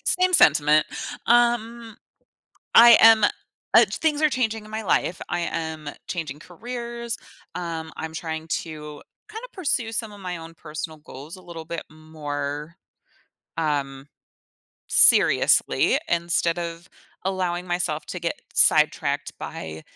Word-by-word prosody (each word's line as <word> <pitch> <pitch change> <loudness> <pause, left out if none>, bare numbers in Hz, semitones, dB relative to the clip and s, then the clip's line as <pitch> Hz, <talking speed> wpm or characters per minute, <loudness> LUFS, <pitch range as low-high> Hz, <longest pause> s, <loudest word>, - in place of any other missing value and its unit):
Same 365 0 +2
sentiment. 155 - +5 0.4
Um, 235 -1 +1 0.8
I 235 -1 +9
am, 225 -1 +7
uh - - +1
things 310 -1 -1
are 310 - +5
changing 225 -5 -2
in 215 - -14
my 220 +1 -4
life. 180 -2 0
I - - -2
am 160 -3 -4 0.2
changing 155 -5 -5
careers, 235 +5 -6 0.4
um, 165 -2 -5
I'm 160 0 -6
trying 160 0 -5 0.2
to 150 -2 -10 0.3
kinda 445 +3 -8
pursue 265 - -2
some 225 -2 -3
of 205 - -13
my 180 -2 -5
own 165 0 -11
personal 155 0 -7
goals 150 +2 -11
a 185 - -15
little 165 -2 -9
bit 170 +1 -5
more, 150 -1 -6 0.8
um, 140 -3 -2 0.8
seriously - - +5
instead 170 0 0
of 170 +1 -6 0.4
allowing 180 -2 -2
myself 175 -4 -2
to 180 - -6
get 170 0 -2 0.2
sidetracked - - +2
by 80 0 -7
170 Hz, 125 wpm, -23 LUFS, 155-225 Hz, 0.8 s, I